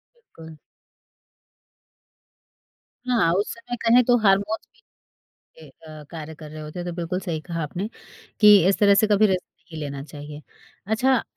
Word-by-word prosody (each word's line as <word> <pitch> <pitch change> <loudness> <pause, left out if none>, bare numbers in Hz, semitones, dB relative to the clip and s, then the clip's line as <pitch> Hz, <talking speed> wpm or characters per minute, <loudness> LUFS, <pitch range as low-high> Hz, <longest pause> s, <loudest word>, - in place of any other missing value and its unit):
बिल्कुल। 165 - -14 2.5
हाँ, 230 -9 +2
उस 200 +3 -1
समय 235 +1 -7
कहें 235 +2 +5
तो 245 0 +4
हार्मोन्स 200 +2 +1 0.7
भी - - -19
ए - - -14
अ, 155 -1 -13
कार्य 160 -1 -8
कर 150 -1 -11
रहे 155 0 -8
होते 150 +3 -8
हैं, 175 - -5
तो 175 - -4
बिल्कुल 175 +1 -3
सही 170 -4 -4
कहा 165 0 -5
आपने 180 +8 -5 0.5
कि 210 -1 +8
इस 195 - +2
तरह 200 -1 +5
से 215 - +3
कभी 210 0 +4
रिस्क 185 -2 0 0.3
नहीं 160 - -6
लेना 140 -1 -6
चाहिए। 145 0 -10 0.5
अच्छा, 250 +3 +2
185 Hz, 160 wpm, -23 LUFS, 155-215 Hz, 2.5 s, कि